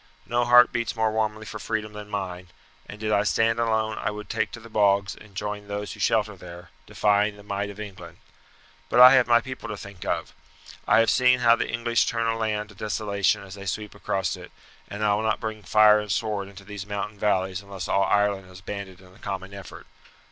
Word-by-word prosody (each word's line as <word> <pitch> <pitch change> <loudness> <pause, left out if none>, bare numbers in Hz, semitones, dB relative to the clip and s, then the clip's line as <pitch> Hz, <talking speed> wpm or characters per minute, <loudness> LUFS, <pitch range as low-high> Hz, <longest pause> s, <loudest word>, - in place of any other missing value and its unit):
No 120 +1 0
heart 120 0 +7
beats 120 -2 -2
more 110 -1 +1
warmly 110 0 -2
for 110 - -7
freedom 105 0 -3
than 105 0 -9
mine; 90 -3 -5 0.4
and 100 - -9
did 110 0 -2
I 100 - +4
stand 115 +2 +1
alone 110 -2 0
I - - -1
would 105 -1 -7
take - - 0
to - - -7
the 115 - -13
bogs 100 -2 +2
and 105 -3 -16
join 105 +1 -4
those 100 0 -4
who - - -13
shelter 110 -2 +1
there, 90 -1 -12 0.2
defying 105 0 +1
the 105 - -13
might 100 0 -3
of 100 0 -10
England. 90 -5 -9 0.7
But 120 - +2
I 125 +1 +11
have 130 -2 +5
my 120 -1 +5
people 130 +2 -7
to 105 - -5
think 100 -3 -10
of. - - -3 0.5
I - - +6
have 115 - +3
seen 125 -1 +4
how 115 -1 +6
the - - -3
English 115 0 +1
turn 115 -1 -1
a 115 0 +1
land 105 -1 -2
to 105 - -15
desolation 100 -1 0
as 95 -1 -10
they 100 0 -9
sweep 105 +3 -4
across 95 -2 -2
it, - - -12 0.4
and 105 +1 -5
I 105 - +3
will 105 - 0
not 110 0 0
bring 110 -1 -5
fire 105 +2 +5
and 105 -1 -5
sword 105 0 -1
into 100 0 -13
these 100 0 -8
mountain 100 0 -4
valleys 95 -2 0
unless 100 -1 -7
all 100 - +2
Ireland 100 -2 +1
is 90 0 -13
banded 95 -2 -7
in 90 -1 -18
a - - -19
common 95 0 -5
effort. 100 -2 -10
105 Hz, 225 wpm, -25 LUFS, 100-110 Hz, 0.7 s, I